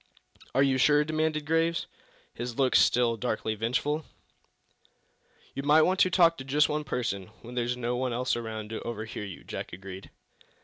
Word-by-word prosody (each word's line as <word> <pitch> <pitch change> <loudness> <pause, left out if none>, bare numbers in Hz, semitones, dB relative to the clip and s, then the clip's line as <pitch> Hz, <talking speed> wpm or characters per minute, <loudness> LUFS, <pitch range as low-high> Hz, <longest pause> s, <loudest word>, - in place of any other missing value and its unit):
"Are 135 - +5
you 135 -1 +2
sure?" 145 +2 +5
demanded 155 0 -1
Graves, 165 +1 +1 0.5
his 120 0 -5
look 130 -2 +2
still 120 -2 +4
darkly 110 -2 -2
vengeful. 125 +8 -1 1.5
"You 135 - -3
might 150 +3 +5 0.3
talk 170 -3 +4
to - - -5
just 145 +3 +3
one 150 0 -2
person 115 -9 -3 0.2
when 120 +1 -9
there's 125 0 -1
no 120 0 -1
one 130 0 -1
else 125 +2 0
around 110 -2 -5
to 110 - -4
overhear 110 -2 -5
you," 95 -3 -9
Jack - - -6
agreed. 95 +1 -9
125 Hz, 160 wpm, -28 LUFS, 115-150 Hz, 1.5 s, Are